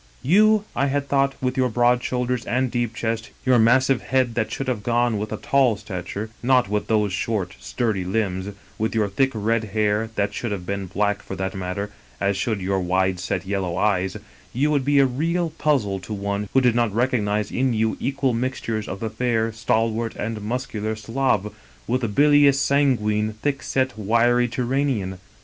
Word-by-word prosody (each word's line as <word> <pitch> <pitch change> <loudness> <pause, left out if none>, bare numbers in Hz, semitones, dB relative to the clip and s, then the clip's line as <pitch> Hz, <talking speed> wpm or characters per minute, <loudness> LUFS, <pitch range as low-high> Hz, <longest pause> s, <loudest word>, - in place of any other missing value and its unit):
" - - -30
You, 215 0 +5
I 140 - +2
had 140 0 -1
thought, 140 -1 +1
with 125 0 -1
your 130 -1 +2
broad 120 +1 +2
shoulders 125 -1 -1
and 130 0 0
deep 120 -2 -1
chest; 115 -1 -2 0.2
your 130 -2 +5
massive 130 +3 +4
head 130 -2 +1
that 110 -1 -1
should 135 - -4
have 125 -5 -1
gone 120 -1 +1
with 105 +1 -4
a - - -2
tall 130 -6 +2
stature, 100 +1 -6
not 125 -2 +3
with 105 +1 -2
those 105 -3 +1
short 95 -2 -2
sturdy 110 -6 -1
limbs; 95 0 -1 0.3
with 110 +1 -1
your 110 -2 +2
thick 120 +8 +1
red 110 +1 0
hair, 105 +1 +1
that 100 0 0
should 120 +1 -3
have 95 -3 -4
been 100 0 -3
black 105 +2 0
for 95 - -7
that 95 0 -3
matter, 95 +2 -4 0.3
as 100 0 +1
should 100 +2 -1
your 95 +1 0
wide 95 0 +1
set 95 0 -3
yellow 95 -3 -2
eyes 95 -3 +1 0.2
— - - -26
^you 145 +4 +2
would 145 -3 +2
be 145 0 +3
a 140 - +6
real 165 +6 -1
puzzle 115 -13 0
to 95 +4 -7
one 100 0 -3
who 135 - +5
did 125 -2 +3
not 120 -2 +1
recognize 105 -4 0
in 130 0 +1
you 110 0 +1
equal 135 -1 0
mixtures 115 -3 -2
df 95 - -5
the 110 - -2
fair, 115 -1 0
stalwart 115 0 0
and 110 0 -4
muscular 110 -1 -3
Slav 110 -2 -1 0.3
with 125 +2 0
the 115 - 0
bilious 145 +4 +5
sanguine, 110 -7 +2
thick 140 +6 -2
set, 130 -1 -1
wiry 120 +3 +3
Turanian. 125 -6 -1
115 Hz, 190 wpm, -23 LUFS, 105-130 Hz, 0.3 s, a